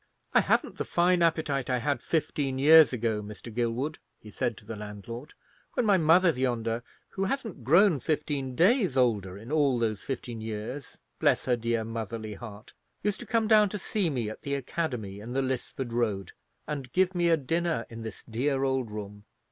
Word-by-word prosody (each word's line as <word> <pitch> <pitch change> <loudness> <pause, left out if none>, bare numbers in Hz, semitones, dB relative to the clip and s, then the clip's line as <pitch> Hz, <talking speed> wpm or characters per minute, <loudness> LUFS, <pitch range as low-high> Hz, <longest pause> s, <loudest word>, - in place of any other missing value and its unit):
"I - - +6
haven't - - 0
the - - +1
fine 175 +1 +2
appetite 155 -5 +1
I 125 - +2
had 140 0 -1
fifteen 145 -4 -1
years 155 +2 +8
ago, 115 -3 -1
Mr. 105 +2 -9
Gilwood," 120 +6 -1 0.2
he 105 - -12
said 115 +1 -2
to 105 - -14
the 115 - -6
landlord, 105 +6 -8 0.4
"when 245 - +1
my 200 -3 +4
mother 170 +3 +5
yonder, 120 -4 -1 0.3
who 195 - -2
hasn't 220 - -3
grown 170 - +5
fifteen 140 -2 -2
days 190 - +3
older 105 -7 +1
in 115 +6 -10
all 145 -5 +3
those 110 -3 -1
fifteen 120 -4 -5
years,—bless 110 +5 -2
her 125 - +3
dear 115 -1 -1
motherly 110 -1 -5
heart!—used 110 - -7
to 240 - -9
come 225 0 +1
down 210 -2 +6
to 210 - -4
see 195 -2 -1
me 125 -7 -2
at 110 - -7
the 140 0 -2
academy 125 -8 -3
in 115 +4 -7
the 135 +1 +1
Lisford 130 -1 -3
Road, 105 -6 -1 0.3
and 140 -4 -5
give 185 0 +3
me 175 -1 +2
a 165 - +5
dinner 165 -2 -1
in 115 0 -9
this 110 -2 -7
dear 135 +4 -1
old 130 -3 0
room. 105 -1 -8
130 Hz, 180 wpm, -28 LUFS, 115-160 Hz, 0.4 s, years